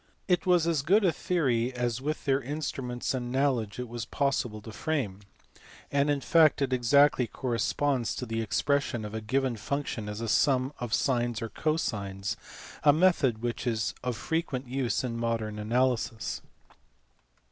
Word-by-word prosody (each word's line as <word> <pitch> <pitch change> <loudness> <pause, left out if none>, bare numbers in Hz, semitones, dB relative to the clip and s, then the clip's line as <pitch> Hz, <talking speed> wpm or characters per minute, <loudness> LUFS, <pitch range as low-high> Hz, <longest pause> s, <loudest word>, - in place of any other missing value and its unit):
It 180 -1 +1
was 175 -3 +4
as 165 -4 +1
good 195 +8 +4
a 175 - +5
theory 130 -8 0
as 120 -1 -1
with 150 +3 -3
their 135 0 +2
instruments 135 -3 -3
and 120 -2 -3
knowledge 130 -6 0
it 125 0 -4
was 120 0 -5
possible 125 -3 -1
to 110 - -8
frame, 115 -7 -2 0.7
and 140 +1 +2
in 145 -1 +1
fact 160 -1 +5
it 135 -2 0
exactly 130 +1 +4
corresponds 130 +1 -1
to 125 - -4
the 115 -1 -2
expression 120 +1 0
of 105 - -7
a 110 - -3
given 130 +3 0
function 125 -3 -3
as 105 +1 -5
a 115 - -3
sum 130 +3 +2
of 120 -3 -4
sines 120 -2 +1
or 115 -1 -4
cosines, 105 -11 -2 0.5
a 145 - +7
method 145 -8 +3
which 120 +1 -2
is 110 -2 0
of 125 -3 -2
frequent 160 -6 -2
use 130 +1 -1
in 120 -2 -3
modern 115 -2 -2
analysis. 120 0 0
125 Hz, 160 wpm, -29 LUFS, 115-145 Hz, 0.7 s, a